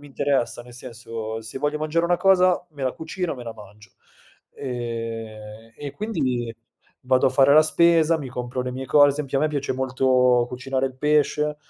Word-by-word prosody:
mi 145 - -13
interessa, 135 -4 -1
nel 120 0 -14
senso, 115 -3 -7
se 110 +3 -9
voglio 150 +1 -1
mangiare 155 +2 0
una 175 0 +2
cosa 185 -2 +3
me 140 -2 -9
la 130 - 0
cucino, 165 0 -4
me 120 - -9
la 115 - -7
mangio. 105 -2 -15 0.7
Ehm, 115 -3 -6
e 145 - -7
e - - -4
quindi 130 - -2 0.5
vado 130 0 +3
a - - -4
fare 140 +1 +5
la 155 - +8
spesa, 165 0 +3
mi 135 -3 -6
compro 125 +1 -4
le 125 0 -4
mie 130 +1 -6
co 145 +2 +5
ad 140 - +4
esempio 140 -2 -2
a - - 0
me 155 - +2
piace 145 -2 -2
molto 125 -1 +2
cucinare 130 +1 -2
il 130 - -7
pesce, 150 +1 +1
130 Hz, 195 wpm, -23 LUFS, 120-150 Hz, 0.7 s, la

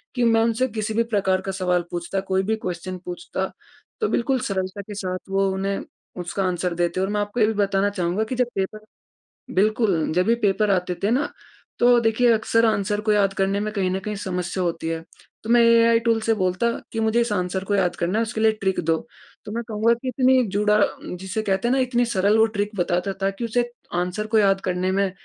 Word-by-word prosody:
कि 245 - +1
मैं 225 -1 +4
उनसे 230 +3 +1
किसी 215 -1 -3
भी 230 +1 +2
प्रकार 190 -2 +2
का 195 - -4
सवाल 180 -2 0
पूछता 175 +2 -3
कोई 190 0 +1
भी 220 +3 0
क्वेश्चन 180 +1 -4
पूछता, 175 0 -4 0.6
तो 435 - +2
बिल्कुल 255 +2 +1
सरलता 195 -4 -3
के 205 +1 -9
साथ 185 -2 -3
वो 195 0 +2
उन्हें, 195 +1 -2 0.4
उसका 175 +3 -3
आंसर 180 -1 -1
देते 175 +1 0
हैं। 190 - +2
और - - -3
मैं 210 - +1
आपको 205 +4 -3
ये 215 - +5
भी 220 - 0
बताना 200 -1 +1
चाहूँगा 185 +2 -1
कि 250 +4 -4
जब 250 -1 +1
पेपर 215 +2 -3 0.7
बिल्कुल 200 -5 +2
जब 180 +1 +2
भी 230 - +4
पेपर 210 -1 +1
आते 180 -1 0
थे 205 - +2
ना, 280 +4 +1 0.5
तो 245 0 +6
देखिए 235 +1 +3
अक्सर 230 +1 +2
आंसर 210 -1 0
को 215 0 +1
याद 200 -2 +3
करने 195 +1 0
में 215 +1 -2
कहीं 190 -3 0
न 190 - -1
कहीं 210 +2 -4
समस्या 180 -1 -3
होती 165 -1 -2
है। 165 0 -3 0.4
तो 220 - -7
मैं 240 0 +6
एआई 230 0 +5
टूल्स 230 -2 0
से 225 - +3
बोलता 185 +4 +1 0.2
कि 225 - -3
मुझे 220 +2 +2
इस 235 -2 -1
आंसर 185 0 -1
को 205 - 0
याद 180 -3 +1
करना 180 +6 0
है, - - +2
उसके 220 0 -4
लिए 220 0 +5
ट्रिक 190 -1 0
दो, 165 0 +1 0.5
तो 210 - -7
मैं 235 +1 -3
कहूँगा 220 +1 +2
कि 240 +2 -6
इतनी 255 0 +3
जुड़ा 210 +2 +2 0.4
जिसे 190 +3 -3
कहते 195 +2 0
हैं 265 +2 +2
इतनी 245 -1 +1
सरल 205 -1 +2
वो 220 - +6
ट्रिक 205 +1 0
बताता 180 +2 0
था 195 - +2
कि 230 +4 -5
उसे 240 +2 +1 0.4
आंसर 180 +4 -2
को - - +7
याद 195 -1 +3
करने 185 0 -1
में 195 -1 +1
205 Hz, 225 wpm, -23 LUFS, 185-225 Hz, 0.7 s, को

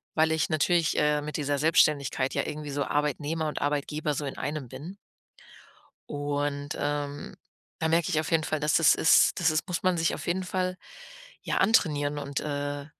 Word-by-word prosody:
weil 160 0 +3
ich 160 - 0
natürlich, 165 +1 +2
äh, 150 0 +2
mit 150 +1 -6
dieser 145 -1 -1
Selbstständigkeit 140 -4 +2
ja - - +1
irgendwie 150 -1 -5
so 140 0 -1
Arbeitnehmer 150 +2 -1
und - - -5
Arbeitgeber 150 +1 -1
so 145 - -3
in 135 - -6
einem 145 -4 -4
bin. 150 +10 -9 1.1
Und, 145 0 -2
ähm, 145 0 -3 0.4
da 160 - +1
merke 165 0 +2
ich 155 - +1
auf 155 - -3
jeden 160 -1 +3
Fall, 155 - -2
dass 150 0 +1
das 165 -4 +6
ist - - +4
das - - +1
das 155 - +2
muss 180 -1 -2
man 185 -2 +2
sich 165 0 +1
auf - - -6
jeden 185 +2 0
Fall 185 0 -2 0.6
ja - - -2
antrainieren 150 -9 +2
und, 140 -1 -3
äh, 145 -1 -3
150 Hz, 185 wpm, -27 LUFS, 145-160 Hz, 1.1 s, das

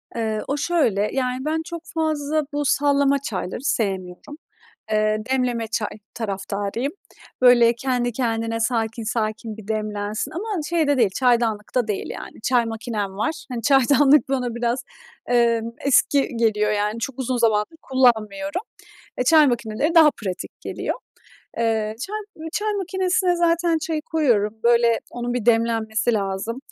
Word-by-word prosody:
Eee, 220 -2 -1
o 280 - -1
şöyle, 255 - +1
yani, 255 0 -1
ben 320 +1 0
çok 340 -1 -6
fazla 310 -1 0
bu 290 0 -1
sallama 280 0 +3
çayları 210 -2 -4
sevmiyorum. 195 +2 -2 0.5
Eee, 215 0 +2
demleme 250 -3 0
çay 220 -1 -2 0.3
taraftarıyım. 205 +4 -3 0.5
Böyle, 240 -2 +6
kendi 245 -1 -1
kendine, 225 -1 -1
sakin 225 0 -1
sakin 220 0 -3
bir 215 -1 -12
demlensin 215 +2 -3
ama 375 +1 -3
şey 335 -3 +1
de 285 - +3
değil, 225 -6 +3
çaydanlıkta 235 -2 +1
değil, 205 - -2
yani, - - -8
çay 245 -1 +2
makinem 220 -3 -4
var. 315 +9 -2
Hani, 235 -2 -4
çaydanlık 280 +1 +4
bana 250 -3 -1
biraz, 240 +2 -1 0.4
emm, 230 -1 +2
eski 280 0 +3
geliyor, 215 -2 +2
yani, 210 +2 -1
çok 265 +3 -5
uzun 255 -1 -1
zamandır 225 +5 +1
kullanmıyorum. 265 - +1 0.6
Eee, 250 - +1
çay 310 +1 +6
makineleri 240 +6 -1
daha 315 -2 +8
pratik 190 -7 -7
geliyor. - - -3 0.6
Eee, 220 -2 0
çay 425 - -4 0.2
m 320 +1 -8
çay 425 0 -1
makinesine 370 -1 0
zaten 335 -1 +2
çayı 315 -1 -3
koyuyorum, 240 -11 +1
böyle, 235 -1 +4
onun 245 0 -4
bir 240 -2 -3
demlenmesi 225 0 +2
lazım. 200 +4 -2
240 Hz, 140 wpm, -22 LUFS, 220-290 Hz, 0.6 s, daha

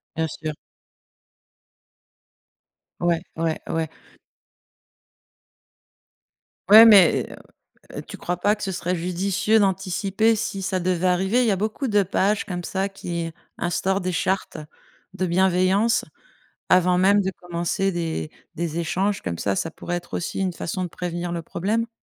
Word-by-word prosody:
Bien 160 0 0
sûr. 155 -1 -3 2.5
Ouais, 170 -1 +1 0.2
ouais, 165 -1 0
ouais. 160 -1 -1 2.8
Ouais, 220 +3 +10
mais, 200 -6 +6
heu - - -9 0.6
heu, - - -3
tu - - -10
crois 175 0 -3
pas 205 +4 +2
que 210 - -9
ce 190 - -2
serait 180 0 -2
judicieux 190 +5 +1
d'anticiper 195 +3 +1
si 200 -3 -3
ça 185 0 -1
devait 185 0 0
arriver? 190 +7 +2
Il - - +2
y - - +3
a 190 - +1
beaucoup 220 +7 -2
de 205 -1 +4
pages 195 +2 0
comme 175 -2 -5
ça 195 +2 -1
qui 170 -4 -5 0.3
instaurent 190 +3 0
des 180 -1 -3
chartes 190 +2 -1 0.6
de 185 -1 -2
bienveillance, 190 +5 +2 0.6
avant 180 0 +4
même 200 +2 +4
de 190 - -1
commencer 175 +2 -1
des 165 -2 -3 0.3
des 170 0 -3
échanges 195 +4 -1
comme 85 -2 -4
ça, 100 -1 -1
ça 165 - -2
pourrait 175 +2 -5
être 175 0 -8
aussi 175 - -3
une 185 -2 0
façon 180 +2 -4
de - - -4
prévenir 175 0 -4
le 170 - -2
problème? 215 +8 -2
185 Hz, 145 wpm, -23 LUFS, 175-195 Hz, 2.8 s, Ouais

